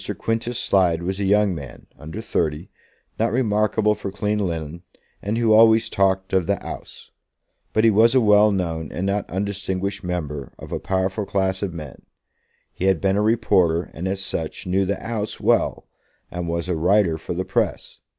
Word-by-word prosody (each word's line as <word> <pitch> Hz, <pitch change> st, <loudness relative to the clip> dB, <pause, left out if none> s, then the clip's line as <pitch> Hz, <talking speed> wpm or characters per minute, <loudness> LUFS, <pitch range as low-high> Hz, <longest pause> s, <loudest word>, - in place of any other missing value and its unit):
Quintus 115 Hz, +1 st, -2 dB
Slide 85 Hz, -6 st, +2 dB
was 95 Hz, +2 st, -3 dB
a 100 Hz, -, 0 dB
young 105 Hz, 0 st, +3 dB
man, 70 Hz, -6 st, -9 dB
under 80 Hz, +7 st, -8 dB
thirty, 80 Hz, -5 st, -2 dB, 0.5 s
not 115 Hz, +1 st, +1 dB
remarkable 105 Hz, -2 st, +2 dB
for 100 Hz, -, -6 dB
clean 105 Hz, +2 st, -1 dB
linen, 85 Hz, -3 st, -3 dB, 0.4 s
and 105 Hz, +3 st, -2 dB
who 115 Hz, -2 st, +3 dB
always 110 Hz, 0 st, +5 dB
talked 95 Hz, -1 st, +1 dB
of 95 Hz, -3 st, +2 dB
the -, -, +1 dB
"'Ouse." -, -, -9 dB, 0.6 s
But 110 Hz, -, +2 dB
he 115 Hz, -, +6 dB
was 115 Hz, +4 st, +4 dB
a -, -, +7 dB
well 105 Hz, -2 st, +5 dB
known 80 Hz, -5 st, -2 dB
and 90 Hz, -, -3 dB
not 100 Hz, +1 st, -1 dB
undistinguished 100 Hz, +1 st, -3 dB
member 75 Hz, -6 st, -4 dB
of -, -, -11 dB
a -, -, -2 dB
powerful 95 Hz, +2 st, -1 dB
class 95 Hz, -1 st, 0 dB
of 100 Hz, -3 st, -2 dB
men. 75 Hz, -5 st, -9 dB, 0.7 s
He 95 Hz, -, -3 dB
had 95 Hz, -3 st, +3 dB
been 95 Hz, 0 st, +1 dB
a 105 Hz, -, +2 dB
reporter, 100 Hz, -7 st, +2 dB
and 90 Hz, +4 st, -4 dB
as 95 Hz, 0 st, -2 dB
such 80 Hz, -2 st, -4 dB
knew 95 Hz, +1 st, +1 dB
the 100 Hz, 0 st, -1 dB
"'Ouse" 110 Hz, -3 st, -3 dB
well, -, -, +1 dB, 0.4 s
and 90 Hz, -1 st, -4 dB
was 85 Hz, +1 st, -2 dB
a 90 Hz, -, 0 dB
writer 90 Hz, 0 st, +2 dB
for 85 Hz, -, -5 dB
the 95 Hz, +2 st, -2 dB
press. -, -, -2 dB
95 Hz, 180 wpm, -22 LUFS, 90-105 Hz, 0.7 s, a